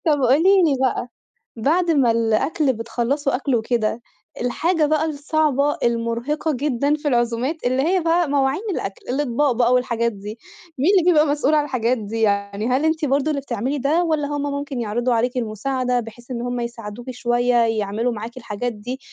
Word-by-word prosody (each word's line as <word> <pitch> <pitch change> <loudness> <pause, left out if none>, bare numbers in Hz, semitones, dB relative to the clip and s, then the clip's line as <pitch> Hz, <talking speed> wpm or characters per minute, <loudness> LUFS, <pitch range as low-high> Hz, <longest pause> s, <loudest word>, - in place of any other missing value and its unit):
طب 295 -3 +3
قولي 330 +10 +5
لي 300 -5 +3
بقى، 255 -2 0 0.5
بعد 330 +9 +1
ما 270 -7 +3
الأكل 230 +6 +1
بتخلّصوا 245 +5 -1
أكل 270 0 0
وكده، 225 0 -1 0.4
الحاجة 315 +7 +1
بقى 310 +1 +1
الصعبة 295 -1 0
المرهقة 235 +6 -1
جدًا 280 +2 0
في 305 0 -5
العزومات 240 +3 0
اللي 255 +2 +1
هي 365 +4 +2
بقى 335 -1 +1
مواعين 275 +3 +1
الأكل، 195 - -5
الإطباق 275 +1 +1
بقى 240 +1 +2
والحاجات 235 -2 +1
دي، 210 +1 -8 0.4
مين 290 +9 +3
اللي 345 - 0
بيبقى 310 -2 +4
مسؤول 290 +1 +1
عن 300 - +4
الحاجات 255 -3 0
دي 225 +1 -4
يعني 200 0 0
هل 260 +5 +1
أنتِ 315 0 +1
برضه 280 +2 +1
اللي 280 -2 -2
بتعملي 260 +2 -2
ده، 295 +6 +1
والّا 310 -4 0
هُم 290 0 -3
ممكن 280 -2 -4
يعرضوا 240 +3 0
عليكِ 245 +2 0
المساعدة 250 +2 -1
بحيث 240 +2 -10
إن 235 - -3
هُم 245 0 -3
يساعدوكِ 235 0 -6
شوية 245 0 +1
يعملوا 220 +2 -1
معاكِ 230 +3 -7
الحاجات 235 0 -4
دي، 245 +5 -6
255 Hz, 175 wpm, -21 LUFS, 235-295 Hz, 0.5 s, قولي